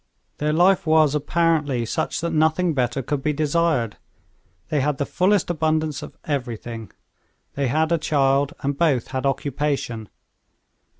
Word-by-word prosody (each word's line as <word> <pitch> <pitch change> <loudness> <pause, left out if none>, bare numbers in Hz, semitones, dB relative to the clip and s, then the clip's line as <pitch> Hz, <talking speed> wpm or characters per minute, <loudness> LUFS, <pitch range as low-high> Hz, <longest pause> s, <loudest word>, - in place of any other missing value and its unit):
Their 150 +1 +1
life 180 +3 +3
was 155 -2 +4
apparently 150 -4 +1
such 110 - -2
that 170 0 -2
nothing 160 +2 +2
better 130 -1 -1
could 145 +2 -2
be 150 +2 0
desired. 150 -6 0 0.7
They 150 -3 +1
had 145 0 0
the 140 - -1
fullest 185 +1 +1
abundance 155 -2 0
of - - -10
everything; 120 - -4 0.6
they 140 -1 -1
had 155 +6 +1
a 170 - +2
child, 140 -2 +1
and 140 +1 -1
both 140 -6 +1
had 130 +1 -1
occupation. 135 - -2
150 Hz, 140 wpm, -23 LUFS, 135-160 Hz, 0.7 s, was